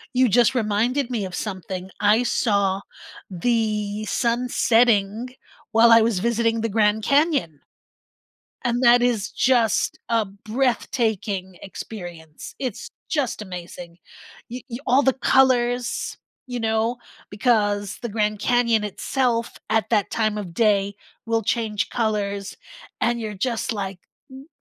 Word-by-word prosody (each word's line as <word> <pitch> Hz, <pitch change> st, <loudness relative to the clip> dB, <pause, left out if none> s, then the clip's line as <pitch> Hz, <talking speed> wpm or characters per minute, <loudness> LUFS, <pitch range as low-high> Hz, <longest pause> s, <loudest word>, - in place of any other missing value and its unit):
You 255 Hz, -2 st, +4 dB
just 245 Hz, +4 st, +4 dB
reminded 240 Hz, +4 st, 0 dB
me 225 Hz, -5 st, -2 dB
of 185 Hz, -, -8 dB
something; 190 Hz, -1 st, -5 dB
I 210 Hz, +3 st, +4 dB
saw 200 Hz, -5 st, +1 dB, 0.5 s
the 215 Hz, +1 st, -1 dB
sun 240 Hz, +2 st, 0 dB
setting 230 Hz, -1 st, +2 dB, 0.4 s
while 230 Hz, +1 st, +6 dB
I 230 Hz, 0 st, +8 dB
was 220 Hz, -4 st, +1 dB
visiting 230 Hz, +1 st, +1 dB
the 230 Hz, -, -1 dB
Grand 210 Hz, 0 st, +2 dB
Canyon. 280 Hz, -, +1 dB, 1.0 s
And 240 Hz, +1 st, 0 dB
that 240 Hz, -1 st, +6 dB
is 230 Hz, -5 st, 0 dB
just 240 Hz, -4 st, +1 dB
a 230 Hz, -2 st, +2 dB
breathtaking 215 Hz, -3 st, -2 dB
experience, 175 Hz, -6 st, -9 dB
it's 255 Hz, -6 st, -5 dB, 0.2 s
just 285 Hz, -8 st, -1 dB
amazing! 175 Hz, -2 st, -9 dB, 0.5 s
Y 245 Hz, 0 st, -6 dB
y 235 Hz, -, -5 dB
all 265 Hz, +3 st, +4 dB
the 265 Hz, -, +4 dB
colors, 245 Hz, -2 st, +1 dB, 0.3 s
you 245 Hz, -, -3 dB
know, 225 Hz, +1 st, 0 dB, 0.3 s
because 205 Hz, -2 st, 0 dB
the 240 Hz, -, -3 dB
Grand 210 Hz, -1 st, -1 dB
Canyon 235 Hz, -3 st, +2 dB
itself, 235 Hz, +3 st, -1 dB, 0.2 s
at 220 Hz, +1 st, +1 dB
that 210 Hz, -3 st, +1 dB
time 215 Hz, -2 st, 0 dB
of 185 Hz, -5 st, -6 dB
day 200 Hz, -2 st, +2 dB, 0.3 s
will 225 Hz, 0 st, +1 dB
change 220 Hz, 0 st, -1 dB
colors, 200 Hz, -3 st, -2 dB, 0.4 s
and 240 Hz, 0 st, +1 dB
you're 215 Hz, -2 st, -4 dB
just 235 Hz, +3 st, -2 dB
like, 195 Hz, -3 st, -5 dB, 0.3 s
"W 265 Hz, +1 st, -12 dB
220 Hz, 130 wpm, -23 LUFS, 205-240 Hz, 1.0 s, I